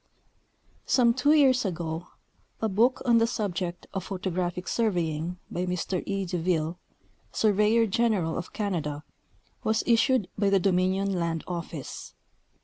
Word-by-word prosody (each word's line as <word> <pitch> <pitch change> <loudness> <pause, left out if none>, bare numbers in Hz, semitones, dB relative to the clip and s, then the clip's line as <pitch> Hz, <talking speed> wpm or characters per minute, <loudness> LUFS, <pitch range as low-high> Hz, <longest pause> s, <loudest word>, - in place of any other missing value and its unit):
— - - -38
Some 235 -2 +5
two 265 +5 +3
years 265 -4 +5
ago 170 -3 -3 0.5
a 220 - 0
book 230 +6 +2
on 235 -2 +5
the 230 - +3
subject 185 -6 -3
of 190 -2 -4
photogra]3liic 180 -1 -3
surveying 175 -6 -1
by 180 +1 -2
Mr 180 0 -2
E. 195 -1 -1
Deville, 175 -1 -1 0.5
sur 215 -2 +2
veyor 215 +3 +3
general 205 -6 +1
of 175 - -5
Canada, 160 -8 -3 0.6
was 220 0 +1
issued 235 -2 +3
by 200 -1 +3
the 195 -1 +4
Dominion 190 +1 +1
land 165 -1 -1
office. 170 -4 -6
190 Hz, 140 wpm, -27 LUFS, 175-220 Hz, 0.6 s, Some